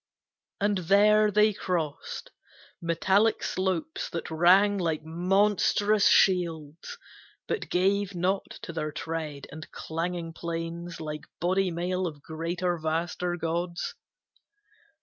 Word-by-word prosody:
And 205 -1 +1
there 210 +4 +5
they 210 +1 +4
crossed 165 -7 -3 0.5
Metallic 190 +6 +2
slopes 185 -4 -2
that 165 -1 -5
rang 190 +5 +5
like 160 -4 -1
monstrous 200 +4 +2
shields, 170 - +2 0.5
But - - -3
gave 195 +1 +1
not 185 +3 0
to 170 - -6
their 155 -2 -3
tread, 155 -2 -5
and 155 +1 -9
clanging 165 +1 -4
plains 170 +1 -5
Like 150 -1 -6
body 185 +2 +1
mail 180 +2 -1
of 150 -3 -8
greater, 170 +2 -2
vaster 170 +2 -1
gods. 170 +1 -2
175 Hz, 110 wpm, -28 LUFS, 165-195 Hz, 0.5 s, there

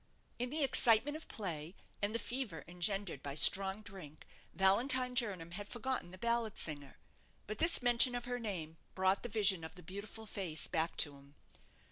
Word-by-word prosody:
In 245 +1 -1
the 300 +2 +2
excitement 255 +1 +4
of 315 - -8
play, 170 -4 -5 0.3
and 205 +2 0
the - - +3
fever 245 +2 -4
engendered 180 -2 -1
by 140 0 -6
strong 195 +6 +4
drink, 190 -8 -11 0.3
Valentine 250 +7 +3
Jernam 195 -9 -1
had 205 +3 -5
forgotten 240 -5 -2
the 185 - -12
ballad 235 0 -1
singer. 145 -3 -4 0.5
But 215 - -6
this 330 -4 +4
mention 245 +1 +4
of 245 0 -4
her 245 0 -3
name 170 -8 -5 0.2
brought 190 +1 +2
the 240 - -5
vision 200 -5 +3
of 160 0 -8
the 180 - -12
beautiful 200 +5 -8
face 180 -7 -2
back 165 -1 -1
to 145 -2 -13
him. 140 +1 -19
200 Hz, 175 wpm, -35 LUFS, 170-240 Hz, 0.5 s, excitement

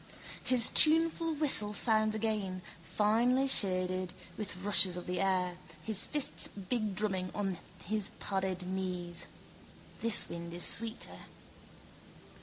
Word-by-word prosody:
His 250 -2 +5
tuneful 325 +1 +3
whistle 265 -9 +3
sounds 215 -1 +1
again, 205 -4 -4 0.2
finely 235 +9 0
shaded, 185 -5 +1 0.2
with 210 0 -7
rushes 190 -2 +4
of 180 - -8
the 180 0 -5
air, 180 -2 -2 0.3
his 220 -3 +3
fists 295 -2 +1
bigdrumming 200 -2 -4
on 195 -4 -4 0.3
his 210 +1 -1
padded 190 -2 -4
knees. 180 -2 -5 0.7
This 230 -2 +5
wind 170 0 -9
is 175 - +1
sweeter. 230 0 0
200 Hz, 110 wpm, -30 LUFS, 185-225 Hz, 0.7 s, His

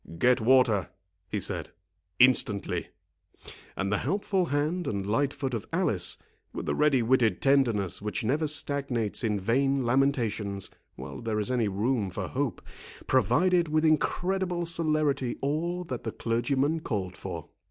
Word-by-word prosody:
"Get 125 +5 +3
water," 115 -5 +4 0.4
he - - -1
said, - - -3 0.5
"instantly." 125 -5 +2 0.9
And 100 0 -1
the 105 - +1
helpful 190 - 0
hand 155 +5 -1
and 100 -2 -2
light 135 +7 +1
foot 135 -2 -4
of 115 -2 -4
Alice, 165 - +1 0.4
with - - -5
the - - 0
ready 145 -5 +3
witted 115 -5 +2
tenderness 120 -11 +2
which 105 +1 -3
never 145 +8 +1
stagnates 140 -7 -1
in 105 -3 0
vain 135 +6 +1
lamentations 115 -6 0 0.2
while - - -8
there 110 -2 -1
is 105 +4 -2
any 120 -4 +1
room 105 +1 0
for - - -4
hope, - - -2 0.4
provided 180 0 +3
with 155 +1 +1
incredible 180 +3 +1
celerity 155 -6 0
all 170 +6 -1
that 130 -8 -5
the - - -3
clergyman 135 +7 0
called 95 - -3
for. 85 -5 -7
130 Hz, 140 wpm, -28 LUFS, 110-150 Hz, 0.9 s, water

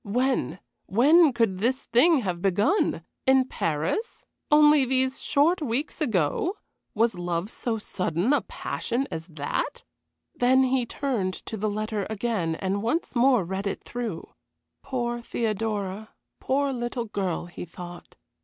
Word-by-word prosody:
When 245 -4 0 0.3
when 295 - +6
could 225 -6 +1
this 255 +5 0
thing 280 +4 +4
have 180 -5 -3
begun? 205 - +2 0.2
In 265 -1 +5
Paris? 165 - -2 0.2
Only 300 -1 +6
these 260 +1 0
short 320 +5 +2
weeks 285 +4 -2
ago 225 - 0 0.4
was 220 -4 +2
love 175 +3 -2
so 230 -2 -2
sudden 185 - -1
a - - +3
passion 255 +3 -3
as 160 +1 -5
that? 150 -4 -3 0.5
Then 260 -3 +4
he 255 -2 +1
turned 225 -11 -1
to - - -5
the 215 0 -1
letter 215 -1 -2
again 205 -6 -1
and 195 +3 -2
once 250 +7 -1
more 245 -3 +4
read 190 +3 -3
it 200 - -4
through. 230 -9 -5 0.5
Poor 240 -2 -2
Theodora, 215 -3 -2 0.3
poor 275 +1 0
little 240 -1 -3
girl, 195 -6 -2
he 175 - -8
thought. 175 +1 -10
230 Hz, 135 wpm, -26 LUFS, 190-265 Hz, 0.5 s, when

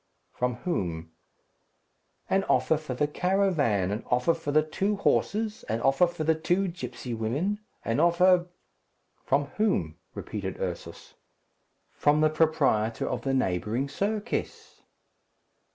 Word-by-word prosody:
"From 125 -1 -1
whom?" 85 - -3 1.2
"An 195 0 +2
offer 160 - +3
for 150 -4 -5
the 150 - +1
caravan, 150 - +1
an 105 +3 -3
offer 125 +7 +2
for 145 - -4
the 155 +1 +4
two 195 +7 -1
horses, 215 +2 0
an 110 +1 0
offer 135 +8 +4
for 170 -2 -5
the 160 +1 +3
two 175 +4 0
gipsy 125 -6 -6
women, 140 - -1 0.3
an 115 +4 0
offer 175 +1 +4 0.4
" - - -44
"From 140 +2 +2
whom?" 90 - 0 0.2
repeated 100 -3 -5
Ursus. 90 -2 -6 0.8
"From 150 +1 +2
the 155 0 +4
proprietor 150 -9 +1
of - - -2
the 135 -1 0
neighbouring 110 +3 0
circus." 205 +9 -3
150 Hz, 130 wpm, -27 LUFS, 115-180 Hz, 1.2 s, the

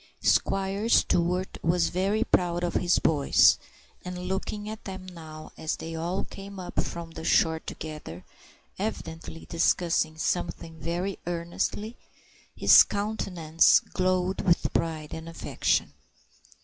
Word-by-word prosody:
Squire 195 +3 +1
Stewart 180 -3 +2
was 170 +1 +2
very 200 +5 +1
proud 175 -6 +1
of 175 - -1
his 175 -1 +2
boys; 145 -3 +4 0.4
and 180 0 -6
looking 205 +2 -3
at 215 0 -7
them 190 -1 -7
now 160 -4 -10
as 160 - -1
they 165 +1 -7
all 170 +4 -2
came 195 0 -9
up 180 - -2
from 170 -1 -6
the 160 0 -8
shore 160 0 +3
together, 150 - -8 0.5
evidently 165 -6 -5
discussing 165 -2 +1
something 165 -1 -3
very 175 +5 -3
earnestly, 175 +6 -3 0.6
his - - +8
countenance 180 -6 +2
glowed 185 0 -1
with 175 -1 +2
pride 155 -2 -2
and 160 +1 -7
affection. 165 - -1
175 Hz, 125 wpm, -27 LUFS, 165-190 Hz, 0.6 s, his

